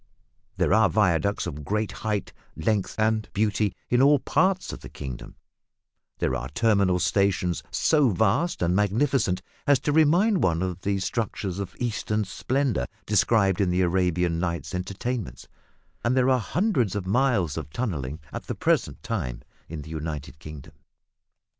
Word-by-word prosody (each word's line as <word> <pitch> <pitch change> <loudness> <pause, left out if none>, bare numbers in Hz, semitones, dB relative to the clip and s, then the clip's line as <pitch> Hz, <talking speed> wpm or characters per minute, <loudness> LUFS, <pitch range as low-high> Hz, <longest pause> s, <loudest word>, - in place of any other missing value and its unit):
There - - +2
are 110 -3 +5
viaducts 100 -1 +1
of 75 +1 -6
great 105 +7 -1
height, 105 -3 -3 0.2
length, 100 +4 -1
and 110 -1 +1
beauty 105 -1 0
in 120 +1 +3
all 145 +2 +6
parts 185 +7 +1
of - - -7
the - - -10
kingdom; 65 -3 -8 0.8
there - - 0
are 65 - -4
terminal 100 - +2
stations 90 -2 +1
so 150 -5 +3
vast 115 - +1
and 85 +1 +2
magnificent 105 -2 +1 0.2
as 145 -1 +6
to 150 - 0
remind 170 +7 +4
one 85 -1 +1
of 90 -1 -4
the 100 0 0
structures 95 -2 -3
of 95 -2 -5
Eastern 110 -3 -1
splendour 125 - -1 0.2
described 100 -2 +3
in 95 - +2
the 90 +1 +1
Arabian 90 -2 +1
Nights 85 -3 -3
Entertainments; 100 +5 -4 0.6
and 120 +2 +1
there 130 +1 +4
are 130 - +3
hundreds 125 - 0
of 100 -3 -3
miles 100 - +1
of 80 -3 -5
tunnelling 80 - -3
at - - -6
the - - -3
present - - 0
time - - -3 0.3
in 80 -2 -6
the 80 - -11
United 75 -3 -5
Kingdom. 75 -3 -10
100 Hz, 155 wpm, -25 LUFS, 85-120 Hz, 0.8 s, all